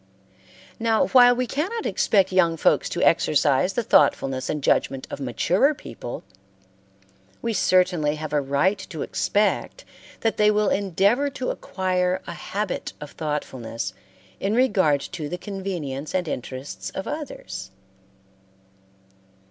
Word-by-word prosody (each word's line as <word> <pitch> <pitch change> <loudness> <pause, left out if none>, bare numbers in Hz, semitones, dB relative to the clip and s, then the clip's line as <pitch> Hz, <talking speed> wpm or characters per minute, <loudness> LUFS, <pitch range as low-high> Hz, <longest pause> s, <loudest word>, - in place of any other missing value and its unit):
Now, 225 +3 +2
while 245 -2 +7
we 250 +1 0
cannot 365 - -3
expect 195 -3 +2
young 170 -3 +3
folks - - +2
to - - -2
exercise 150 +3 +3
the 240 - -1
thoughtfulness 135 -10 +2
and 150 -2 -2
judgment 135 0 +1
of - - -5
maturer 180 - +2
people, 120 - -8 1.2
we 230 - 0
certainly 180 -6 +2
have 155 -1 -6
a 145 - +3
right 140 +9 +1
to 160 -6 -4
expect 210 - 0 0.4
that 225 - 0
they 210 0 +5
will 210 0 +2
endeavor 200 +8 +2
to 260 -2 -3
acquire 185 -1 -1
a 170 - -6
habit 200 +6 -4
of 150 -2 -8
thoughtfulness 120 - -4 0.5
in 200 +3 0
regard 185 - +3
to 150 +1 -6
the 180 - -3
convenience 180 -8 -5
and 180 -2 0
interests 130 0 -5
of 190 - -6
others. 95 - -6
185 Hz, 130 wpm, -24 LUFS, 145-210 Hz, 1.2 s, while